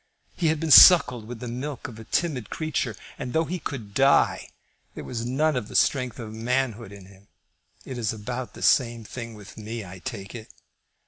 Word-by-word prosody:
He 170 - 0
had 155 -1 +1
been 160 -1 -2
suckled 125 - +8
with 120 -1 -8
the 125 - -5
milk 130 +3 -5
of 115 -3 -11
a - - -9
timid 140 -9 -2
creature, 155 -8 -3 0.2
and, 125 -3 -5
though 160 +1 +2
he 180 +2 -4
could 115 -9 -7
die, 135 +4 +3 0.5
there - - -7
was 120 -1 -5
none 150 +4 +1
of 120 -5 -3
the - - -11
strength 125 -3 +1
of 110 -3 -8
manhood 115 -1 -2
in 100 -2 -12
him. 100 +1 -19 0.6
It 130 -2 -6
is 110 -3 -1
about 120 +3 -6
the - - -8
same 120 -3 +2
thing 115 0 -8
with 105 -2 -13
me, 110 0 -6
I 90 +1 -10
take 100 +2 -7
it." 110 -2 -9
120 Hz, 200 wpm, -25 LUFS, 110-135 Hz, 0.6 s, suckled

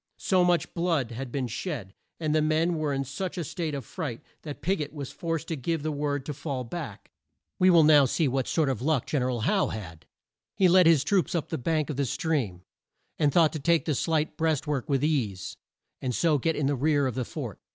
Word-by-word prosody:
So 185 -3 +2
much 175 -1 +1
blood 165 -8 0
had 125 +2 -6
been 135 -1 -1
shed, 120 - -5 0.3
and 155 -2 0
the 155 - +3
men 155 +3 +2
were 150 -2 0
in 135 0 -1
such 145 +9 -5
a 175 - -1
state 160 0 -3
of 135 -4 -5
fright, 140 -7 -5 0.2
that 150 -2 -8
Pig 190 -1 +1
ot 145 - -5
was 140 -4 -6
forced 165 -1 -3
to 165 - -1
give 155 +3 -2
the 155 - -1
word 145 -2 -2
to 150 - -4
fall 135 -2 -4
back. 115 - -7 0.5
We 185 - +6
will 170 -3 +7
now 150 -2 +7
see 150 +4 +1
what 130 0 -1
sort 160 -3 +1
of 130 -5 -1
luck 145 -2 +1
Gen 145 - -1
er 125 - 0
al 120 -3 -2
Howe 190 - +2
had. 85 -7 -8 0.5
He 190 - +4
led 180 -1 +6
his 160 -5 +5
troops 185 +3 +1
up 165 - -2
the - - -3
bank 155 +3 0
of 140 - -5
the 140 - +1
stream, 120 - -1 0.6
and 150 -3 +3
thought 160 0 +4
to 155 - -3
take 170 +3 +2
the 155 - +1
slight 155 +2 0
breast 160 -3 +1
work 145 -1 -2
with 140 -1 +1
ease, 120 -12 -1 0.5
and 125 -2 -2
so 155 -4 +2
get 160 +5 0
in 150 - -1
the 140 +1 +1
rear 145 +1 +2
of 130 - -1
the 130 +2 -2
fort. - - -6
150 Hz, 235 wpm, -27 LUFS, 130-165 Hz, 0.6 s, will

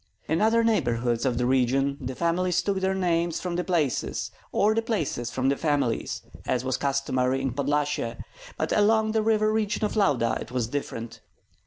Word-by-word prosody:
In 160 +4 +1
other 225 +2 +4
neighborhoods 120 - +1
of 125 - 0
the 125 - +1
region 135 +2 +2
the 130 0 -4
families 175 +2 +1
took 200 -2 0
their 190 0 0
names 170 -3 0
from 180 -1 -3
the 180 - 0
places, 155 - -1 0.2
or 210 +2 +3
the 225 - +1
places 160 - -2
from 130 +1 0
the 140 - +2
families, 145 -6 -1 0.2
as 125 0 0
was 130 - 0
customary 135 -2 0
in 135 -2 -2
Podlyasye; 145 -3 -1 0.4
but - - -2
along 220 +1 +3
the 220 0 +1
river 215 0 +2
region 215 -1 0
of 210 - -3
Lauda 140 - +2
it - - -7
was 125 -2 0
different. 115 -2 -5
145 Hz, 180 wpm, -26 LUFS, 130-200 Hz, 0.4 s, other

